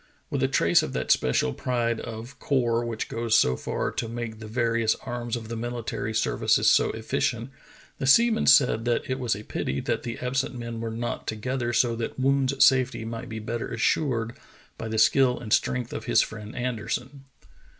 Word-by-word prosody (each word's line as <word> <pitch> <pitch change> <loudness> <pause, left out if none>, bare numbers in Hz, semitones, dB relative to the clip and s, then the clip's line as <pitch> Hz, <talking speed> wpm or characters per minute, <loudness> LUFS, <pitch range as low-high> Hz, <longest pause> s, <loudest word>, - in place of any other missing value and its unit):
With - - -1
a - - +3
trace - - +3
of - - -4
that 65 0 -1
special 65 0 +2
pride 115 - -1
of 115 +3 -8
corps 120 -4 +1
which 115 -2 -3
goes 115 -1 +1
so 65 - +3
far - - -3
to 115 - -3
make 115 -2 -5
the 110 - -8
various 115 -1 +1
arms 120 -1 -3
of 115 -2 -6
the 115 - -6
mihtary 115 -2 -4
services 110 - +3
so - - +4
efficient, 120 +3 -2 0.5
the 135 - -1
seamen 230 - +5
said 125 -5 +5
that 120 -1 0
it 130 0 -2
was 120 -4 0
a 105 - -8
pity 70 -9 -3
that - - -1
the 120 -2 -5
absent 130 0 -2
men 115 -1 -5
were 115 - -3
not 115 +2 -4
together 120 +3 -2
so 120 0 +2
that 115 +2 -4
Woon's 135 0 +3
safety 130 -4 +2
might 115 0 -6
be 110 - -5
better 115 +2 -4
assured 120 -6 0 0.4
by 115 - -6
the 110 0 -3
skill 125 +3 +4
and 110 -3 -2
strength 125 -2 0
of - - -5
his - - +4
friend 105 0 -8
Anderson. 125 +3 -4
120 Hz, 190 wpm, -26 LUFS, 115-125 Hz, 0.5 s, seamen